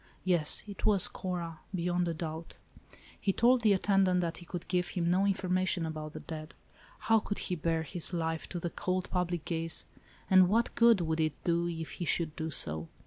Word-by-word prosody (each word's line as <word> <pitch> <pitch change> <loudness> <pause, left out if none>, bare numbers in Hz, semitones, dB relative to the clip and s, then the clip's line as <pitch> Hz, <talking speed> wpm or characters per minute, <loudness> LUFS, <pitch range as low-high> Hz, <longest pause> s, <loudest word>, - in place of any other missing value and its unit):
Yes, 175 -5 +4
it 205 -2 -9
was 205 -3 +4
Cora, 170 -4 -5 0.2
beyond 175 0 0
a 170 - -1
doubt. 160 0 -6 0.3
* - - -23
He 195 - +1
told 240 +5 +3
the 215 -3 +4
attendant 190 -1 +2
that 170 -1 -3
he 175 - -13
could 175 -1 -6
give 180 -1 0
him 175 -2 -1
no 190 +2 +2
information 185 -2 0
about 155 -1 -6
the - - -7
dead. 155 -1 -8 0.5
How 225 0 +3
could 205 -1 -5
he - - -3
bare 165 0 -1
his 170 +2 +2
life 165 -2 -3
to 175 - -4
the 170 0 -4
cold 185 0 -3
public 175 -3 -2
gaze, 165 -1 +2 0.4
and 185 -1 +6
what 230 +4 +1
good 230 -4 +5
would 160 -1 -1
it 155 -2 +1
do 170 0 +1
if 165 -2 -5
he - - -1
should 160 -1 -1
do 160 0 -4
so? 80 - -1
175 Hz, 200 wpm, -30 LUFS, 165-185 Hz, 0.5 s, and